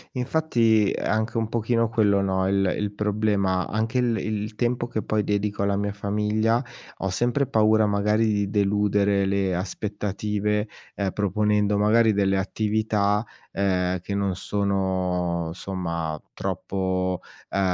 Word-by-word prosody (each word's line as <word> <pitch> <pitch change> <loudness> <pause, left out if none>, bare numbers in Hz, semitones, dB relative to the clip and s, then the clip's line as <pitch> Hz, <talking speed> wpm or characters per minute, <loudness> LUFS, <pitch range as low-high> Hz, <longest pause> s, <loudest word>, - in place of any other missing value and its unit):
Infatti, 120 -6 +2
è - - -3
anche 110 +2 0
un 110 -1 0
pochino 115 0 +1
quello, 105 -4 +3
no, 95 -1 0
il 95 -1 +2
il 105 -1 -2
problema. 105 -3 0
Anche 110 +3 -1
il 120 -2 +1
il 105 0 -3
tempo 120 +1 0
che, 110 -2 -3
poi, 110 -1 0
dedico 100 0 -1
alla 100 0 +1
mia 100 +1 -1
famiglia, 105 +4 0 0.4
ho 95 - -1
sempre 120 +8 +1
paura, 110 -2 +3
magari, 105 +2 +2
di 100 -1 0
deludere 100 -1 +2
le 95 -1 0
aspettative, 105 +2 -2 0.3
ehm, 100 -2 -1
proponendo, 105 +1 +1
magari 110 +2 +4
delle 100 -1 +2
attività, 105 +1 0 0.3
ehm, 90 -2 0
che 100 +3 -5
non 100 -2 0
sono, 95 -4 -1
insomma, 85 -3 -4
troppo, 95 -1 -2 0.3
ehm, - - -1
105 Hz, 135 wpm, -24 LUFS, 95-110 Hz, 0.4 s, magari